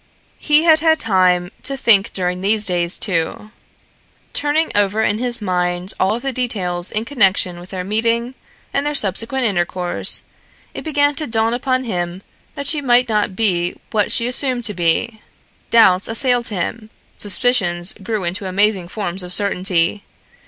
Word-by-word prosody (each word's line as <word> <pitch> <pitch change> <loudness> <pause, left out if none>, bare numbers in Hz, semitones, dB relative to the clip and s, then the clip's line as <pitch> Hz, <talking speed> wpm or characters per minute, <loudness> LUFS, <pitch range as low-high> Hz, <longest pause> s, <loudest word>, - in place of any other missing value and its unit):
He 300 +1 +3
had 320 -2 +5
had 320 0 +2
time 180 -4 +1
to 275 -1 -3
think 215 -6 +3
during 180 -1 -3
these 210 +2 +3
days, 175 -1 0
too. 185 +2 -2 0.8
Turning 300 +2 0
over 205 +1 +1
in 210 0 0
his 245 -1 -1
mind 180 -1 -1
all 190 +3 +1
of 240 - -7
the 270 -1 -2
details 185 -8 -2
in 215 +1 -2
connection 195 -8 +1
with 175 +1 -12
their 185 -2 -5
meeting 230 +5 -1 0.4
and 275 - 0
their 295 0 -2
subsequent 230 +4 0
intercourse, 180 -3 0 0.5
it - - -7
began 290 -2 +1
to 310 +1 -3
dawn 225 0 0
upon 255 +1 -1
him 180 -4 -4 0.3
that 280 -1 -5
she 295 +1 +1
might 250 -2 +3
not 210 -3 0
be 180 -5 +1 0.2
what 210 -2 0
she 235 - +1
assumed 250 0 0
to 210 -2 0
be. 190 +6 -1 0.5
Doubts 190 -5 +4
assailed 245 +1 +1
him, 215 +2 -4 0.3
suspicions 200 -5 +1
grew 210 0 -3
into 185 +3 -3
amazing 195 -1 0
forms 190 -1 -1
of 180 0 -1
certainty. 185 -1 +2
210 Hz, 160 wpm, -18 LUFS, 180-245 Hz, 0.8 s, had